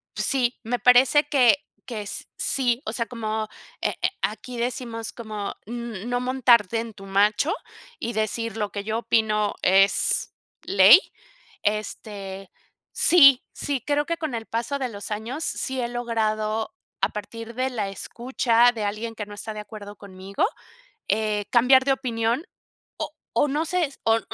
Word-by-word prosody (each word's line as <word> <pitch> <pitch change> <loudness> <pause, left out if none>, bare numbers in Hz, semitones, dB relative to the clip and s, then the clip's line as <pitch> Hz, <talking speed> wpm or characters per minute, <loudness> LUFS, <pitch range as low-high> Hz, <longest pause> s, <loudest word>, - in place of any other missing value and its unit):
Pues, - - -1
sí, 250 -2 0
me 245 +2 -2
parece 255 +4 +6
que 270 -3 +5 0.3
que 230 -4 -5
s 205 - -5
sí, 250 -1 +2
o - - -3
sea, 230 -2 -2
como 220 -2 -3 0.3
eh - - 0
eh 360 - +4
aquí, 220 +4 -3
decimos 235 -2 -3
como 215 -3 -6
n 235 -3 -6
n - - -8
no 245 0 -1
montarte 245 -4 +3
en 230 -1 -5
tu 195 -1 -12
macho 205 +9 +2 0.5
y 235 - -3
decir 220 +1 -2
lo 210 -2 -2
que 200 - -4
yo 220 +2 -2
opino 215 -2 +1
es 195 +2 +3 0.3
ley, 200 - +8 0.6
este, 200 -2 -4 0.4
sí, 275 -7 +6
sí, 280 -3 -2
creo 290 0 +1
que 335 +1 -2
con 310 -6 -3
el 225 -1 -5
paso 235 +6 -2
de 265 -2 -2
los 205 -2 -7
años, 225 +9 -4
sí 265 -3 -1
he 235 - -1
logrado 220 -2 -2 0.3
a - - +3
partir 230 +2 -8
de 255 +1 0
la 210 -5 -2
escucha, 240 +3 +2
de 225 -3 -5
alguien 215 +3 -3
que 210 - -5
no 205 - -11
está 215 +1 -6
de 210 - -5
acuerdo 205 -1 -10
conmigo, 195 - -3 0.6
eh, 210 0 0
cambiar 255 +2 +6
de 275 - +4
opinión, 240 +2 -1 0.5
o - - -4 0.2
o - - +3
no 295 +3 -1
sé, 360 +1 +1
s 275 -2 -11
o 225 0 +3
230 Hz, 170 wpm, -24 LUFS, 210-250 Hz, 0.6 s, ley